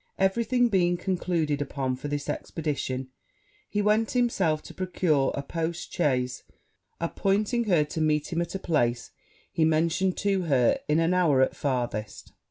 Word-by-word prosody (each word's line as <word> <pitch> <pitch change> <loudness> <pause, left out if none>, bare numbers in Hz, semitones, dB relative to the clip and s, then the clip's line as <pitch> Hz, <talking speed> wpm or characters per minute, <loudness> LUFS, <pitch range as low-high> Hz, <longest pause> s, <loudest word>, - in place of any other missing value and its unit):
Everything 235 +6 +2
being 175 -5 +2
concluded 170 -5 -1
upon 135 -2 -2
for 130 - -6
this 145 0 -3
expedition, 135 -5 -3 0.6
he 205 0 0
went 215 +2 +2
himself 195 -11 +1
to - - -11
procure 170 -6 +1
a 140 - -3
post 165 +3 -4
chaise, 130 -6 0 0.6
appointing 205 +7 0
her 175 -7 +3
to 150 +2 -4
meet 155 +1 +1
him 170 - +1
at 170 - -4
a - - +1
place 120 -10 0 0.4
he 165 - +1
mentioned 165 +4 +2
to 200 -2 +1
her 130 -6 +3
in 150 - +2
an 165 +2 +2
hour 165 -7 +3
at - - -1
farthest. 120 -6 -3
165 Hz, 155 wpm, -27 LUFS, 145-190 Hz, 0.6 s, her